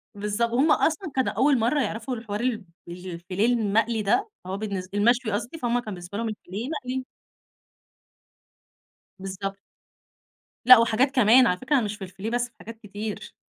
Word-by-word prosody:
بالضب 210 Hz, +3 st, -1 dB
وهُم 275 Hz, +6 st, +3 dB
أصلًا 320 Hz, +3 st, +1 dB
كانوا 260 Hz, -1 st, +1 dB
أول 275 Hz, -1 st, +3 dB
مرَّة 245 Hz, +6 st, +2 dB
يعرَفوا 230 Hz, +2 st, -3 dB
الحوار 215 Hz, -3 st, -5 dB
ال 240 Hz, -4 st, -1 dB, 0.3 s
الفيليه 180 Hz, +2 st, -3 dB
المقلي 225 Hz, -1 st, +1 dB
ده، 375 Hz, -, +1 dB, 0.2 s
هو 190 Hz, +1 st, -4 dB
بالنس 200 Hz, -3 st, -4 dB
المشوي 230 Hz, +3 st, +2 dB
قصدي، 225 Hz, +9 st, -3 dB
فهُم 245 Hz, -4 st, 0 dB
كان 215 Hz, -4 st, -6 dB
بالنسبة 180 Hz, +2 st, -8 dB
لهُم 230 Hz, 0 st, -2 dB
الفيليه 210 Hz, +2 st, -6 dB
مقلي. 260 Hz, -4 st, -4 dB, 2.1 s
بالضبط. 195 Hz, +1 st, -5 dB, 1.1 s
لأ 255 Hz, 0 st, +11 dB
وحاجات 230 Hz, +4 st, +2 dB
كمان، 245 Hz, +1 st, +6 dB
على 180 Hz, -, +1 dB
فكرة 260 Hz, +6 st, 0 dB
أنا 250 Hz, -5 st, +2 dB
مش 210 Hz, 0 st, -4 dB
في 210 Hz, -, -20 dB
الفيليه 190 Hz, +3 st, -6 dB
بس، 240 Hz, +1 st, 0 dB
في 240 Hz, -, -31 dB
حاجات 225 Hz, +1 st, -10 dB
كتير. 210 Hz, 0 st, -7 dB
225 Hz, 160 wpm, -25 LUFS, 200-250 Hz, 2.1 s, لأ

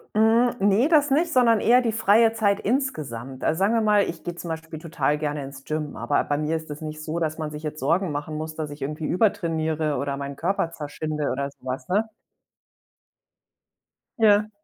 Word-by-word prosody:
Hm, 225 Hz, +3 st, +4 dB
ne, 205 Hz, +7 st, +3 dB
das 295 Hz, -3 st, +4 dB
nicht, 320 Hz, +4 st, +2 dB
sondern 235 Hz, -4 st, +4 dB
eher 245 Hz, +2 st, +5 dB
die 230 Hz, -, 0 dB
freie 220 Hz, +1 st, +4 dB
Zeit 205 Hz, -3 st, +1 dB
insgesamt. 140 Hz, -, -3 dB
Also, 160 Hz, -, +1 dB
sagen 200 Hz, +4 st, +2 dB
wir 230 Hz, -, +3 dB
mal, 210 Hz, -1 st, +4 dB
ich 165 Hz, -1 st, -7 dB
geh 175 Hz, -, -4 dB
zum 175 Hz, 0 st, -8 dB
Beispiel 160 Hz, -1 st, -6 dB
total 150 Hz, -3 st, -1 dB
gerne 150 Hz, -2 st, -3 dB
ins 135 Hz, 0 st, -10 dB
Gym, 155 Hz, -1 st, -4 dB
aber 145 Hz, -, 0 dB
bei 145 Hz, -, -1 dB
mir 155 Hz, +2 st, 0 dB
ist 160 Hz, -1 st, -8 dB
das 150 Hz, +1 st, -6 dB
nicht 155 Hz, 0 st, -6 dB
so, 160 Hz, +2 st, -3 dB
dass 160 Hz, -2 st, -1 dB
man 155 Hz, -1 st, -3 dB
sich 150 Hz, +1 st, -8 dB
jetzt 155 Hz, 0 st, -5 dB
Sorgen 170 Hz, +6 st, +1 dB
machen 145 Hz, +1 st, -4 dB
muss, 155 Hz, 0 st, -5 dB
dass 155 Hz, -2 st, -4 dB
ich 145 Hz, 0 st, -10 dB
irgendwie 150 Hz, +3 st, -4 dB
übertrainiere 160 Hz, -6 st, 0 dB
oder 140 Hz, +1 st, -2 dB
meinen 140 Hz, 0 st, -6 dB
Körper 170 Hz, +1 st, -1 dB
zerschinde 150 Hz, -1 st, -4 dB
oder 140 Hz, +1 st, -2 dB
so -, -, -29 dB
was, 130 Hz, +1 st, -4 dB
ne? 210 Hz, +5 st, +1 dB, 2.1 s
Ja. 215 Hz, -1 st, +4 dB
160 Hz, 200 wpm, -24 LUFS, 150-210 Hz, 2.1 s, eher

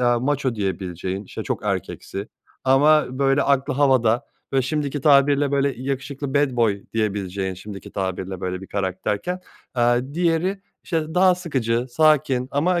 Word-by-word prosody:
aaa, 120 Hz, -1 st, +3 dB
maço 135 Hz, -2 st, 0 dB
diyebileceğin, 95 Hz, -1 st, -3 dB
işte, -, -, -7 dB
çok -, -, -3 dB
erkeksi 100 Hz, +3 st, -4 dB, 0.4 s
ama, 145 Hz, +4 st, +5 dB
böyle, 135 Hz, 0 st, +3 dB
aklı 140 Hz, 0 st, +1 dB
havada 125 Hz, -5 st, +3 dB, 0.3 s
ve 135 Hz, -1 st, +3 dB
şimdiki 145 Hz, +1 st, -2 dB
tabirle, 140 Hz, 0 st, +4 dB
böyle, 140 Hz, -1 st, +2 dB
yakışıklı 135 Hz, +1 st, -4 dB
bad 140 Hz, -3 st, +2 dB
boy 105 Hz, -4 st, +2 dB
diyebileceğin 100 Hz, -3 st, -2 dB
şimdiki 100 Hz, +1 st, -9 dB
tabirle, 95 Hz, -1 st, -3 dB
böyle, 90 Hz, 0 st, -3 dB
bir 95 Hz, -, -9 dB
karakterken, 100 Hz, -, -2 dB, 0.3 s
aaa, 120 Hz, +3 st, +1 dB
diğeri, 175 Hz, +3 st, +1 dB, 0.2 s
işte, 160 Hz, -1 st, -2 dB
daha 185 Hz, 0 st, +5 dB
sıkıcı, 130 Hz, -9 st, -1 dB
sakin 135 Hz, -4 st, +3 dB
ama 170 Hz, +5 st, +1 dB
130 Hz, 140 wpm, -22 LUFS, 105-145 Hz, 0.4 s, ama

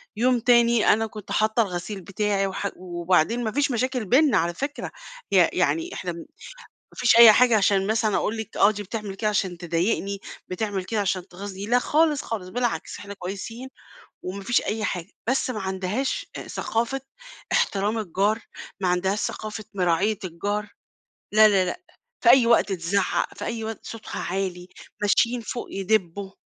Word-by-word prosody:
يوم 245 Hz, +2 st, +2 dB
تاني 235 Hz, -1 st, +4 dB
أنا 220 Hz, +1 st, 0 dB
كنت 210 Hz, -1 st, -10 dB
حاطّة 220 Hz, +2 st, +2 dB
الغسيل 190 Hz, +1 st, -5 dB
بتاعي 200 Hz, +1 st, -1 dB
وح 195 Hz, +1 st, -3 dB
وبعدين 180 Hz, +5 st, 0 dB
ما 220 Hz, -, -1 dB
فيش 280 Hz, +1 st, +1 dB
مشاكل 250 Hz, -1 st, -1 dB
بيننا 260 Hz, 0 st, +4 dB
على 170 Hz, 0 st, +1 dB
فكرة. 280 Hz, +8 st, -4 dB, 0.4 s
ي -, -, +1 dB
يعني 335 Hz, +2 st, +2 dB
إحنا 180 Hz, -1 st, -4 dB
م -, -, -8 dB
ما -, -, -9 dB, 0.7 s
فيش 240 Hz, -, +4 dB
أي 230 Hz, -2 st, +11 dB
حاجة 240 Hz, -1 st, +5 dB
عشان 195 Hz, -1 st, +2 dB
مثلًا 220 Hz, -1 st, +1 dB
أقول 225 Hz, -, -1 dB
لِك 220 Hz, 0 st, -7 dB
آه 200 Hz, -, +6 dB
دي 210 Hz, -1 st, -4 dB
بتعمل 205 Hz, -1 st, -5 dB
كده 215 Hz, +1 st, -1 dB
عشان 185 Hz, -4 st, -1 dB
تضايقني، 185 Hz, +4 st, -1 dB, 0.3 s
بتعمل 195 Hz, 0 st, -3 dB
كده 215 Hz, +2 st, -1 dB
عشان 185 Hz, -2 st, -1 dB
تغيظني 195 Hz, +2 st, -7 dB
لأ 245 Hz, +2 st, +4 dB
خالص، 300 Hz, +2 st, +2 dB
خالص 200 Hz, -5 st, -5 dB
بالعكس، 240 Hz, +3 st, -2 dB
إحنا 200 Hz, 0 st, -8 dB
كويسين 205 Hz, +7 st, -6 dB, 0.6 s
وما 195 Hz, +2 st, -5 dB
فيش 240 Hz, +4 st, +2 dB
أي 215 Hz, +1 st, -3 dB
حاجة. 180 Hz, -1 st, -3 dB, 0.2 s
بس 260 Hz, 0 st, +1 dB
ما 220 Hz, -4 st, -3 dB
عندهاش 195 Hz, -, -2 dB
أ -, -, -7 dB
ثقافة 235 Hz, +4 st, -2 dB, 0.5 s
احترام 205 Hz, +3 st, +1 dB
الجار، 205 Hz, +3 st, 0 dB, 0.4 s
ما 185 Hz, -, 0 dB
عندهاش 190 Hz, +3 st, +1 dB
ثقافة 215 Hz, 0 st, -4 dB
مراعية 190 Hz, +3 st, +1 dB
الجار 205 Hz, +4 st, -3 dB, 0.7 s
لا، 215 Hz, 0 st, +7 dB
لا، 195 Hz, -3 st, +3 dB
لأ. 180 Hz, -, -4 dB, 0.4 s
في 235 Hz, -, +5 dB
أي 250 Hz, -2 st, +7 dB
وقت 230 Hz, -4 st, +4 dB
تِزعّق، 185 Hz, +2 st, 0 dB
في -, -, -7 dB
أي 230 Hz, -1 st, -3 dB
وقت 225 Hz, 0 st, -5 dB
صوتها 225 Hz, -1 st, -7 dB
عالي، 180 Hz, -1 st, -3 dB, 0.3 s
ماشيين 235 Hz, +4 st, +2 dB
فوق 240 Hz, +2 st, -5 dB
يدبّوا. 195 Hz, -1 st, -1 dB
210 Hz, 170 wpm, -24 LUFS, 190-230 Hz, 0.7 s, أي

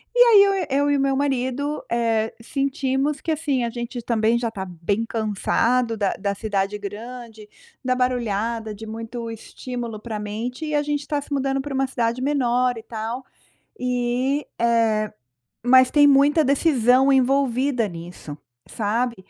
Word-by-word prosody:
e -, -, +1 dB
aí 420 Hz, -4 st, +8 dB
eu 395 Hz, 0 st, +3 dB, 0.3 s
eu 285 Hz, 0 st, +2 dB
e 285 Hz, -, +3 dB
o -, -, -1 dB
meu 275 Hz, 0 st, +1 dB
marido, 275 Hz, +1 st, -1 dB
eh, 225 Hz, -2 st, +1 dB
sentimos 275 Hz, +2 st, -1 dB
que 325 Hz, -, -2 dB
assim, 290 Hz, -5 st, 0 dB
a 235 Hz, -, -1 dB
gente 240 Hz, +1 st, -5 dB
também 225 Hz, 0 st, +2 dB
já 235 Hz, -1 st, -1 dB
está 200 Hz, -4 st, -6 dB
bem 185 Hz, +5 st, -2 dB
cansado 225 Hz, +2 st, 0 dB
da 200 Hz, -2 st, 0 dB
da 200 Hz, 0 st, -1 dB
cidade 200 Hz, -1 st, -1 dB
grande, 220 Hz, +1 st, -8 dB, 0.3 s
da 255 Hz, -1 st, +1 dB
barulhada, 230 Hz, -3 st, -1 dB
de 220 Hz, +2 st, -9 dB
muito 230 Hz, +1 st, -6 dB
estímulo 235 Hz, 0 st, -6 dB
para 215 Hz, -1 st, -5 dB
mente 225 Hz, +7 st, -4 dB
e 300 Hz, -, -1 dB
a 295 Hz, -, +2 dB
gente 295 Hz, -1 st, -1 dB
está 290 Hz, 0 st, -2 dB
se 285 Hz, -, -14 dB
mudando 270 Hz, 0 st, 0 dB
para 285 Hz, 0 st, -6 dB
uma 270 Hz, 0 st, +1 dB
cidade 240 Hz, -1 st, -1 dB
menor 250 Hz, -3 st, +1 dB
e 225 Hz, -, -8 dB
tal, 230 Hz, +3 st, -5 dB, 0.6 s
e, 250 Hz, +3 st, 0 dB, 0.2 s
eh, 225 Hz, -2 st, +2 dB, 0.5 s
mas 255 Hz, +1 st, +6 dB
tem 290 Hz, -1 st, +6 dB
muita 285 Hz, +3 st, +5 dB
decisão 270 Hz, -2 st, +3 dB
envolvida 265 Hz, -2 st, +2 dB
nisso, 170 Hz, -4 st, -9 dB, 0.3 s
sabe, 230 Hz, +3 st, -1 dB
245 Hz, 160 wpm, -23 LUFS, 220-270 Hz, 0.6 s, aí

